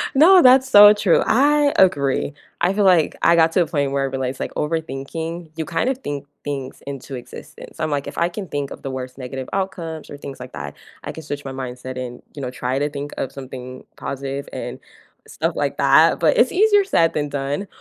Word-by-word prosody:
No, 360 +6 +7
that's 260 -1 +6
so 205 -3 +9
true. 200 -4 +2
I 290 +3 +3
agree. 140 -6 +2 0.3
I 180 +3 +2
feel 205 0 +1
like 175 -5 +4
I 170 - +5
got 165 -1 +4
to 185 - +3
a 170 - +3
point 140 -3 -1
where 140 0 0
I - - 0
realized 130 -1 -3
like - - -4
overthinking, 160 +2 -4
you 160 - -2
kind 165 - -1
of 265 - -1
think 145 - -5 0.2
things 135 -2 -5
into 135 -1 -6
existence. 125 +5 -11
I'm 155 - -1
like, 140 -1 -2
if - - -8
I 170 +1 +2
can 190 +1 -7
think 145 -3 -4
of - - -9
the 135 - -4
worst 130 0 -6
negative 130 0 -6
outcomes 170 -5 -4
or - - -8
things 140 -1 -9
like 125 0 -10
that, 70 -1 -7 0.3
I - - -5
can 160 - -9
switch 145 -1 -5
my 135 - -5
mindset 130 -1 -6
and, 125 -1 -6
you 145 - -8
know, 130 - -3
try 130 +1 -2
to 145 - 0
think 145 0 -6
of 130 - -3
something 130 -1 -9
positive 140 +1 -5
and - - -6 0.5
stuff - - -2
like - - -2
that, - - +5
but - - +3
it's - - +4
easier 410 +1 +4
said 165 - +2
than 145 -1 -2
done. 140 +7 -3
145 Hz, 220 wpm, -21 LUFS, 135-180 Hz, 0.5 s, so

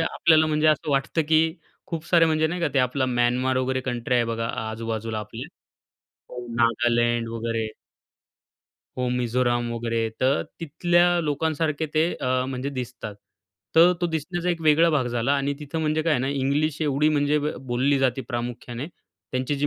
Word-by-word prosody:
आपल्याला 160 -1 +3
म्हणजे 155 0 +1
असं 155 -1 +2
वाटतं, 140 +4 +1
की 160 +2 +3 0.3
खूप 165 -2 -5
सारे 170 -2 +5
म्हणजे 155 0 +2
नाही 175 +2 -3
का 165 - +1
ते - - +3
आपला 130 +1 +1
म्यानमार 125 +1 +1
वगैरे 130 0 0
कंट्री 125 -1 -2
आहे 120 -1 +3
बघा 115 0 -2 0.2
आजू-बाजूला 110 -1 -4
आपले 105 0 -7 1.1
नागालँड 120 0 +1
वगैरे. 115 -1 -2 1.3
हो, 125 -1 0
मिझोराम 120 -1 0
वगैरे 115 -1 -1
तर 130 +2 +2 0.2
तिथल्या 175 +3 +2 0.2
लोकांसारखे 155 +1 -1
ते 155 +1 +4
अ, 130 0 0
म्हणजे 130 +1 -3
दिसतात. 125 -5 -6 0.6
तर 170 +2 +7
तो 175 - +2
दिसण्याचा 170 +2 -3
एक 170 -1 -2
वेगळा 160 +2 +5
भाग 140 -5 +1
झाला 120 +3 0
आणि 140 0 -1
तिथे 150 +2 -5
म्हणजे 155 0 0
काय 165 -1 +1
आहे 125 - +2
ना 130 - -1
इंग्लिश 140 +3 0
एवढी 150 +1 +2
म्हणजे 145 0 +2
अ, - - +3
ब 150 - -1 0.2
बोलली 135 +3 +2
जाते 135 -1 +1
प्रामुख्याने. 120 +2 -5 0.5
त्यांची 130 +3 -1
जी 145 +1 0
135 Hz, 165 wpm, -24 LUFS, 120-155 Hz, 1.3 s, तर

